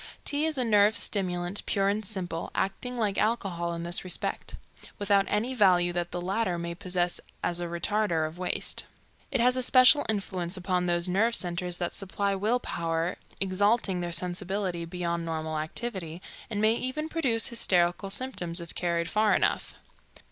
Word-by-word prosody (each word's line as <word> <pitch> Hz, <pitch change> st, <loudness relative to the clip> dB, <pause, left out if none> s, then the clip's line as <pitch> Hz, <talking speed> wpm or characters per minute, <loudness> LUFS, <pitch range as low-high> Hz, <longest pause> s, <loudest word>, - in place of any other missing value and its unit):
Tea 295 Hz, +2 st, +1 dB
is 310 Hz, -3 st, -2 dB
a 255 Hz, -, +2 dB
nerve 210 Hz, -1 st, +4 dB
stimulant, 180 Hz, -1 st, 0 dB
pure 195 Hz, -1 st, +2 dB
and 205 Hz, +2 st, 0 dB
simple, 185 Hz, -5 st, -3 dB
acting 245 Hz, +6 st, -2 dB
like 210 Hz, -4 st, 0 dB
alcohol 190 Hz, -6 st, 0 dB
in 170 Hz, -, -5 dB
this 175 Hz, +1 st, 0 dB
respect, 185 Hz, -, -3 dB, 0.4 s
without 200 Hz, -1 st, +3 dB
any 225 Hz, +5 st, 0 dB
value 180 Hz, -6 st, +4 dB
that 175 Hz, 0 st, -2 dB
the 175 Hz, -, -4 dB
latter 185 Hz, 0 st, -1 dB
may 170 Hz, 0 st, -4 dB
possess 180 Hz, -1 st, -1 dB, 0.2 s
as 175 Hz, 0 st, +1 dB
a 175 Hz, -, -2 dB
retarder 170 Hz, -1 st, 0 dB
of 160 Hz, +3 st, -11 dB
waste. 180 Hz, -, 0 dB, 0.4 s
It -, -, 0 dB
has 250 Hz, +2 st, +4 dB
a 255 Hz, -, 0 dB
special 255 Hz, +3 st, +6 dB
influence 190 Hz, -3 st, -2 dB
upon 180 Hz, -1 st, 0 dB
those 175 Hz, 0 st, +2 dB
nerve 220 Hz, +6 st, +2 dB
centers 175 Hz, 0 st, -1 dB
that 175 Hz, -, -3 dB
supply 200 Hz, +1 st, -1 dB
will 215 Hz, +6 st, +1 dB
power, 165 Hz, -3 st, -2 dB, 0.2 s
exalting 195 Hz, 0 st, +2 dB
their 175 Hz, 0 st, -3 dB
sensibility 180 Hz, 0 st, -1 dB
beyond 170 Hz, 0 st, -2 dB
normal 160 Hz, -1 st, -3 dB
activity, 170 Hz, 0 st, -4 dB, 0.3 s
and 210 Hz, -3 st, -2 dB
may 215 Hz, +1 st, +4 dB
even 260 Hz, +6 st, -2 dB
produce 270 Hz, -9 st, 0 dB
hysterical 185 Hz, -5 st, +1 dB
symptoms, 195 Hz, -7 st, -2 dB
if 170 Hz, -1 st, -6 dB
carried 170 Hz, -1 st, 0 dB
far 215 Hz, +2 st, +3 dB
enough. -, -, 0 dB
185 Hz, 165 wpm, -28 LUFS, 175-215 Hz, 0.4 s, special